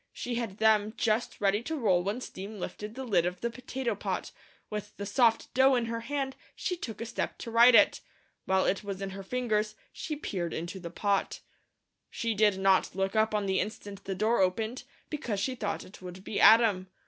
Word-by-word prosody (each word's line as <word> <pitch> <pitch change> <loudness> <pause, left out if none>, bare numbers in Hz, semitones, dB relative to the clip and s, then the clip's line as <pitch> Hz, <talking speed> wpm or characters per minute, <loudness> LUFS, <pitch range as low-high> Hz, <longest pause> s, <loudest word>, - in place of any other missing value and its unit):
She 245 - -5
had 230 -5 -3
them 215 0 +3
just 225 +1 0
ready 200 +1 +2
to 320 +7 -4
roll 200 - +2
when 205 +6 -2
steam 205 -1 -7
lifted 210 +4 -6
the 265 - -5
lid 195 -9 +2
of 180 0 -4
the 235 - -1
potato 255 +1 -3
pot; - - -4 0.4
with 210 -1 -6
the 200 - -4
soft 225 +2 +2
dough 265 +1 +5
in 240 -2 +1
her 230 0 -3
hand 270 +2 -3 0.2
she 360 - -2
took 225 - -7
a - - -2
step 235 - -3
to 230 - -7
right 235 +2 +7
it. - - +5 0.4
While 190 0 +2
it 195 - 0
was 200 -2 -5
in 195 -1 -4
her 195 +1 -7
fingers, 215 -1 -1 0.2
she 315 -1 -4
peered 180 - -3
into 170 +4 -5
the 170 -2 -7
pot. 200 +3 -1 0.7
She 230 -3 -2
did 210 -2 +3
not 190 -1 +3
look 195 +2 -1
up 220 0 +2
on 205 -1 0
the 190 -1 +1
instant 205 -2 -5
the 195 - -3
door 220 +3 +2
opened, 220 +7 -1 0.3
because 250 -10 -2
she 255 +6 -1
thought 210 -5 -3
it 190 - -14
would 180 +1 -9
be 205 - -3
Adam. 220 -5 +6
215 Hz, 205 wpm, -29 LUFS, 195-235 Hz, 0.7 s, right